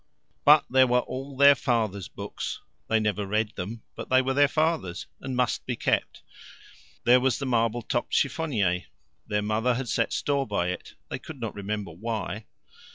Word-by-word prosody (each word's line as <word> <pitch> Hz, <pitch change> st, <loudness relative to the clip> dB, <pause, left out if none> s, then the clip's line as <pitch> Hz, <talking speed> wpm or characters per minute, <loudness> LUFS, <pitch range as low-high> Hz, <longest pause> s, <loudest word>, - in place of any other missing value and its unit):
But -, -, +7 dB
there 130 Hz, 0 st, +5 dB
were 125 Hz, 0 st, +3 dB
all 135 Hz, +2 st, -7 dB
their 140 Hz, +1 st, +8 dB
father's 110 Hz, -8 st, -1 dB
books 100 Hz, -2 st, -6 dB, 0.3 s
they 110 Hz, -, +3 dB
never 105 Hz, -1 st, 0 dB
read 105 Hz, +1 st, 0 dB
them, 110 Hz, +5 st, -6 dB
but -, -, -7 dB
they 130 Hz, -, +5 dB
were 130 Hz, +1 st, 0 dB
their 145 Hz, +1 st, +5 dB
father's, 155 Hz, -, 0 dB
and 130 Hz, -1 st, -5 dB
must 125 Hz, 0 st, 0 dB
be -, -, -1 dB
kept. -, -, -1 dB, 0.8 s
There 125 Hz, +1 st, +6 dB
was 130 Hz, -1 st, +1 dB
the 140 Hz, -, -4 dB
marble 115 Hz, -2 st, +1 dB
topped 120 Hz, -, -2 dB
chiffonier 110 Hz, -, +1 dB, 0.4 s
their 105 Hz, 0 st, 0 dB
mother 110 Hz, +4 st, +1 dB
had 125 Hz, 0 st, -3 dB
set 115 Hz, -, +1 dB
store 140 Hz, -1 st, 0 dB
by 90 Hz, -4 st, 0 dB
it, 90 Hz, -, -6 dB, 0.2 s
they -, -, -3 dB
could -, -, -10 dB
not -, -, -4 dB
remember 100 Hz, -2 st, -4 dB
why. 105 Hz, +2 st, -4 dB
115 Hz, 175 wpm, -27 LUFS, 105-130 Hz, 0.8 s, their